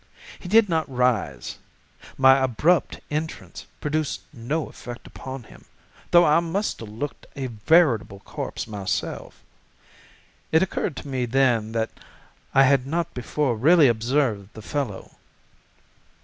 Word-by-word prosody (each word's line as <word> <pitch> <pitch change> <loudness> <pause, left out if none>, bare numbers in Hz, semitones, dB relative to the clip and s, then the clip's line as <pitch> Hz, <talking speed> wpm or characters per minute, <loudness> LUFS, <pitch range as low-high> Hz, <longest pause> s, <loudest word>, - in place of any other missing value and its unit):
He 180 - -8
did 220 +1 +6
not 160 -4 0
rise: 125 - -1 0.6
my 135 0 +6
abrupt 150 +8 +2
entrance 155 +2 -5
produced 150 0 -1
no 140 +5 -3
effect 120 0 -10
upon 130 -1 -8
him, - - -17 0.4
though 175 0 +6
I 150 +1 +5
must 170 +5 -2
have 115 - -8
looked 120 +8 -6
a 135 - -3
veritable 120 - +2
corpse - - -5
myself. 105 -3 -4 1.1
It 160 +3 +5
occurred 175 -4 -2
to - - -7
me 130 -3 -2
then 120 -3 +2
that 115 -1 -1 0.6
I 135 - +6
had 135 -1 +3
not 170 +3 -2
before 125 +1 -1
really 150 +6 +6
observed 115 -3 0
the 110 - -9
fellow. 135 -6 -4
135 Hz, 130 wpm, -24 LUFS, 115-155 Hz, 1.1 s, did